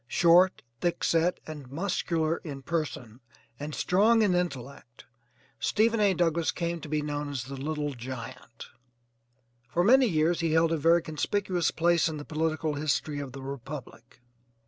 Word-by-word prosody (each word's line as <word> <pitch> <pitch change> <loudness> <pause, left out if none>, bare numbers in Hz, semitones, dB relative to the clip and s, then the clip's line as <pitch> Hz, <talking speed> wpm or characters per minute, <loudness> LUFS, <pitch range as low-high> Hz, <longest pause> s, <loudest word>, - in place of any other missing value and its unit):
Short, 175 +5 +4 0.2
thickset, 170 0 +1
and 150 -5 -9
muscular 165 0 -1
in 140 -4 -8
person, 145 -8 -4 0.4
and 150 +1 -5
strong 220 +5 +3
in 195 -3 +3
intellect 140 -8 -4 0.5
Stephen 225 +1 +2
A. 200 -3 +3
Douglass 165 -1 +1
came 170 -1 -3
to 150 - -8
be 150 0 0
known 145 0 -3
as 135 -4 -3
'The 135 +2 -8
Little 150 +1 -3
Giant.' 125 -1 -8 1.0
For 175 +7 +1
many 255 +5 +6
years 165 -2 +1
he 165 -2 0
held 160 0 +3
a 165 - +1
very 165 +2 +4
conspicuous 175 +3 -1
place 170 0 +2
in 155 - -5
the 145 - -8
political 155 0 -1
history 145 0 -1
of 140 -3 -6
the 135 0 -8
republic. 135 -1 -9
155 Hz, 150 wpm, -28 LUFS, 140-170 Hz, 1.0 s, many